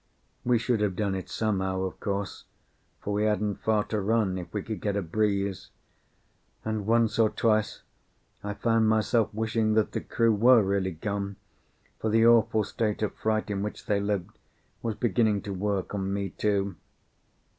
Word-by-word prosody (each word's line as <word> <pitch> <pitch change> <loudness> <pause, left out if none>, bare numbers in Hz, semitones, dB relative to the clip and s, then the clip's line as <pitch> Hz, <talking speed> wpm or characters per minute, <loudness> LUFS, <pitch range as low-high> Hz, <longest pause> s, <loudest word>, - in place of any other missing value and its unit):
We 120 -1 +3
should 115 0 0
have 100 -3 0
done 100 0 0
it 95 -2 -5
somehow, 95 -4 -1
of 95 - -4
course, 100 -1 -3 0.6
for 105 - -3
we 105 +1 +1
hadn't 105 -1 0
far 110 -1 +2
to 105 0 -2
run 100 -3 +1
if 90 - -8
we 105 -2 -3
could 110 -5 -5
get 100 -1 -1
a 100 - +1
breeze; 100 +1 -1 1.0
and 110 -2 -2
once 115 0 +2
or 110 -1 +5
twice 110 -1 0 0.6
I 105 0 -4
found 115 0 +2
myself 110 0 +2
wishing 110 0 0
that 110 -1 +2
the - - -3
crew 115 -1 +2
were 115 +2 +6
really 95 -1 0
gone, 100 +3 -3 0.6
for 110 - -1
the 115 +1 +4
awful 115 -2 +5
state 105 +1 -2
of 105 - -1
fright 110 -1 -1
in 100 -1 -1
which 105 +1 -5
they 100 -1 +1
lived 100 -3 -3 0.4
was 115 -2 -2
beginning 110 -2 +1
to 100 - -4
work 100 0 -2
on 95 -1 -2
me 100 0 -2
too. 100 -1 -1
105 Hz, 175 wpm, -27 LUFS, 100-110 Hz, 1.0 s, were